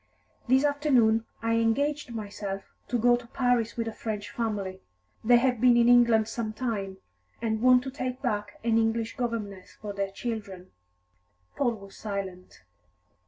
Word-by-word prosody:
"This 260 +3 +4
afternoon 255 -7 +3 0.2
I 230 0 +2
engaged 280 +5 0
myself 200 -3 -5 0.2
to 245 - 0
go 240 +1 +4
to 240 -1 -7
Paris 245 -3 0
with 230 -1 -1
a 225 - -4
French 215 -2 -5
family. 205 -6 -3 0.4
They 240 +2 +6
have 245 -2 +1
been 245 -1 +6
in 235 0 +5
England 235 -3 +5
some 225 -1 -3
time, 205 -6 -3 0.4
and 220 -1 -1
want 250 0 +6
to 265 - -5
take 255 -2 -4
back 210 -5 -3
an 230 -1 +3
English 225 0 0
governess 215 -6 -4
for 210 -1 -6
their 200 -1 -2
children." 195 -4 -6 0.8
Paul 240 -4 +1
was 200 -2 -13
silent. 195 -3 -6
230 Hz, 155 wpm, -28 LUFS, 205-245 Hz, 0.8 s, They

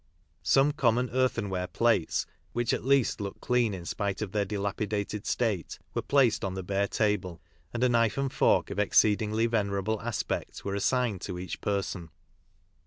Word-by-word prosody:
Some 135 +2 +4
common 125 -3 +1
earthenware 115 -8 0
plates, 110 -3 +1 0.3
which 120 -1 0
at - - -2
least 135 -4 +2
looked 100 -1 -5
clean 125 -3 +1
in 85 -2 -8
spite 100 +1 -2
of 100 - -6
their 105 -1 0
dilapidated 105 +1 -3
state, 110 -8 -1 0.2
were - - -1
placed 135 -5 +3
on 95 -1 -2
the 95 - -4
bare 100 +2 0
table, 100 -6 -1 0.3
and 120 +1 -2
a 125 - +4
knife 115 -1 +2
and 135 -1 -1
fork - - +3
of - - -3
exceedingly 105 +2 +3
venerable 105 -2 0
aspect 115 -2 -3
were 100 - -2
assigned 105 0 0
to 90 -3 -5
each 90 -1 -6
person. 95 -4 -2
105 Hz, 165 wpm, -29 LUFS, 100-120 Hz, 0.3 s, Some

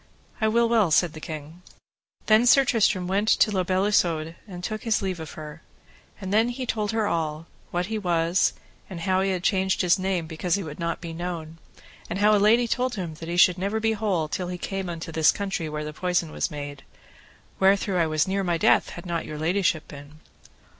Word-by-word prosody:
I 220 - +3
will 235 +2 +3
well, 225 -6 +3
said 160 +1 +3
the 155 - -8
king. 155 +2 -8 0.6
Then 220 +3 +5
Sir 270 +2 +6
Tristram 215 -6 +2
went 200 +3 +2
unto 215 - +4
La 185 - +2
Beale 185 +2 +1
Isoud 165 -6 +1
and 180 -3 -9
took 215 +3 -3
his 225 -2 +1
leave 185 -3 -2
of 160 -3 -8
her. 155 +1 -9 0.6
And 190 -1 -4
then 225 +3 +3
he 255 +1 -4
told 215 -3 -2
her 220 -1 0
all, 160 -3 -2 0.2
what 175 +1 -1
he 220 +2 -3
was, 170 -1 +1 0.4
and 180 -3 -7
how 185 +1 +1
he 195 - +1
had 185 -2 -2
changed 190 -1 +1
his 180 +2 +3
name 185 -3 -1
because 165 +2 -1
he 200 - -3
would 155 -1 -8
not 170 0 -2
be 165 -2 -6
known, 165 -2 -6 0.5
and 175 - -3
how 210 +1 +4
a 205 - +2
lady 230 +3 +4
told 250 +1 -1
him 175 -5 -4
that 165 - -7
he 175 - -2
should 180 0 +5
never 200 +4 -1
be 225 0 +1
whole 200 -7 -1
till 180 +4 -3
he 180 0 -4
came 190 0 -4
into 165 -1 -6
this 160 -1 +4
country 195 -5 -3
where 150 0 -4
the 150 - -6
poison 175 -1 -1
was - - -2
made, 145 -1 -7 0.8
wherethrough 195 -1 +3
I 165 - +2
was 155 +1 +1
near 195 +1 0
my 175 -2 0
death - - +3
had 175 - -9
not 170 -2 -3
your 155 - -6
ladyship 170 0 0
been. 145 +1 -12
180 Hz, 220 wpm, -25 LUFS, 165-205 Hz, 0.8 s, Sir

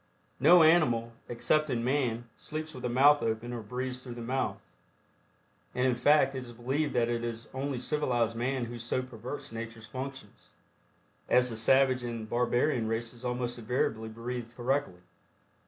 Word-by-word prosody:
No 165 +5 +7
animal, 125 -9 +4 0.2
excepting 125 +1 +1
man, 120 -3 0
sleeps 155 +1 -6
with 125 - -8
the 125 - -2
mouth 145 +4 +5
open 115 +2 -2
or 120 - -4
breathes 125 +3 -4
through 125 -2 -8
the 120 - -7
mouth, 130 +3 -1 1.2
and 125 - +1
in 130 - +3
fact 140 +3 +4
it 130 - -3
is 120 -2 -9
believed 135 +5 -1
that 120 -1 +3
it 120 0 -1
is 115 -1 -5
only 135 0 -2
civilized 120 -4 0
man 125 +1 -1
who 120 +1 -7
so 120 +2 -1
perverts 125 +2 -7
nature's 115 -1 -7
functions, 130 +3 -8 0.8
as 125 -1 +4
the - - -4
savage 130 +3 +3
and 115 -2 -4
barbarian 120 +1 +1
races 115 +2 -4
almost 125 -1 -2
invariably 110 -1 -1
breathe 115 +1 -5
correctly. 130 -7 -1
125 Hz, 155 wpm, -30 LUFS, 115-135 Hz, 1.2 s, No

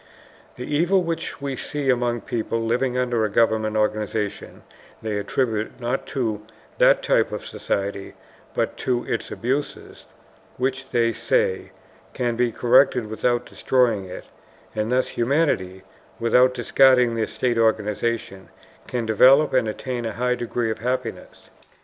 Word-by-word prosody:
The 125 - -6
evil 175 +7 +2
which 165 -3 -4
we 140 -1 -3
see 140 +1 -1
among 120 -1 0
peoples 115 0 -2
living 125 +2 0
under 120 -3 0
a 110 - +1
government 110 0 +1
organization 105 -1 -2 0.4
they 110 -2 -2
attribute 110 +1 -2
not 125 +2 -2
to 115 -6 -2 0.4
that - - +5
type - - +2
of - - -5
society, 100 0 -3 0.4
but - - -1
to 125 -1 -1
its 115 - -3
abuses, 135 +5 -4 0.5
which, 135 +1 -2
they 115 -1 +1
say, 95 -2 0 0.5
can 120 -2 -1
be 120 0 +1
corrected 125 -2 +3
without 120 +2 0
destroying 120 -7 +1
it, 90 - -9 0.5
and 110 +2 -2
thus 130 +1 +1
humanity, 115 - 0 0.4
without 125 +2 +4
discarding 130 -4 +4
the 115 -1 -1
state 120 +1 -1
organization, 110 -2 -1 0.4
can 120 -2 -2
develop 130 +7 +5
and 130 -4 +2
attain 120 +2 -4
a 110 - -4
high 125 +2 0
degree 120 -1 -2
of - - -5
happiness. 125 +2 -4
120 Hz, 135 wpm, -23 LUFS, 110-130 Hz, 0.5 s, that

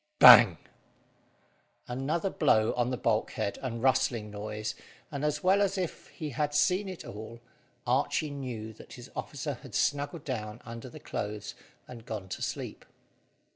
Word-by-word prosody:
Bang! 100 -9 +10 1.3
Another 145 +9 -1
blow 110 -8 +3
on 120 0 +1
the 125 - -2
bulkhead, 110 -3 0
and 115 -3 -4
rustling 120 -5 +2
noise, 105 +1 -4 0.4
and, 140 -1 -4
as 150 0 0
well 190 +2 +4
as 195 -1 +1
if 180 -3 -4
he 155 -4 -6
had 145 +2 -1
seen 185 +6 +3
it 185 - -7
all, 110 +3 -8 0.5
Archy 155 -2 +1
knew 120 -6 -5
that - - -13
his - - -11
officer - - -4
had - - -10
snuggled 145 +2 0
down 110 -4 -4
under 115 +2 -7
the - - -11
clothes, 105 0 -4 0.3
and 115 -2 -11
gone 100 -4 -5
to - - -5
sleep. - - -4
125 Hz, 150 wpm, -30 LUFS, 110-150 Hz, 1.3 s, Bang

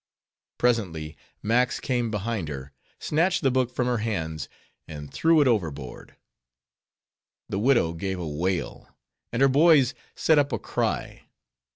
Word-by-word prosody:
Presently 90 -11 0 0.3
Max 125 +4 +2
came 120 -3 -1
behind 105 -3 -2
her, 70 -1 -7 0.3
snatched 170 +3 +1
the 135 - +3
book 130 -1 +1
from 125 0 -1
her 125 -2 0
hands, 80 - -3 0.4
and 75 -2 -9
threw 165 -1 +4
it 140 - +4
overboard. 80 - -2 1.3
The 95 - -2
widow 115 -8 +3
gave 95 +3 -3
a 85 - -4
wail, 85 +5 -3 0.4
and 120 +3 +1
her - - +7
boys 140 -2 +5 0.2
set 160 -2 +4
up 145 0 +1
a - - 0
cry. - - -3
115 Hz, 140 wpm, -26 LUFS, 80-130 Hz, 1.3 s, her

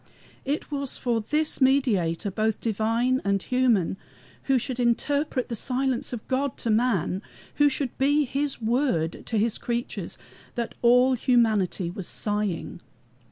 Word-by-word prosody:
It 290 +2 -2
was 280 -2 -3
for 235 -2 0
this 300 +6 0
Mediator, 210 -10 +2
both 215 +2 0
divine 230 +4 +1
and 200 0 +1
human, 235 -6 +1 0.5
who 270 -1 +3
should 250 +1 -3
interpret 260 +3 0
the 235 - -4
silence 255 +2 -1
of 240 -4 -6
God 270 +1 -1
to 230 - -1
man, 215 -5 +1 0.4
who 290 0 +5
should 275 -2 -3
be 290 +2 +3
his 275 +2 -2
Word 225 - 0
to 225 - -1
his 220 +1 +1
creatures, 240 0 -3 0.4
that 235 -1 -3
all 250 +2 +5
humanity 220 -8 +2
was 185 -1 -6
sighing. 205 -5 -2
240 Hz, 140 wpm, -26 LUFS, 215-265 Hz, 0.5 s, who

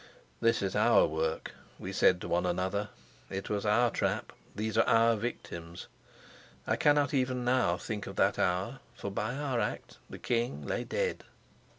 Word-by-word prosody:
"This 115 -3 +2
is 95 - -1
our - - +5
work," 80 0 -2 0.3
we 95 - -6
said 90 -1 +4
to - - -5
one 90 +1 +1
another. 95 +3 -1 0.4
"It 95 +2 -5
was 105 0 -1
our 120 +3 +4
trap, - - -1 0.2
these 110 +1 -2
are 115 - +4
our 115 0 +5
victims." 85 -7 -6 0.8
I - - +1
cannot 145 -1 +3
even 130 -2 0
now 125 0 +2
think 105 -3 -5
of 100 - -7
that 100 +1 +2
hour, 95 +9 0 0.2
for 100 - -5
by 110 +5 -2
our 135 -4 -1
act - - -4
the - - -8
king 120 +2 -1
lay - - -2
dead. 485 -1 -2
110 Hz, 170 wpm, -31 LUFS, 95-125 Hz, 0.8 s, our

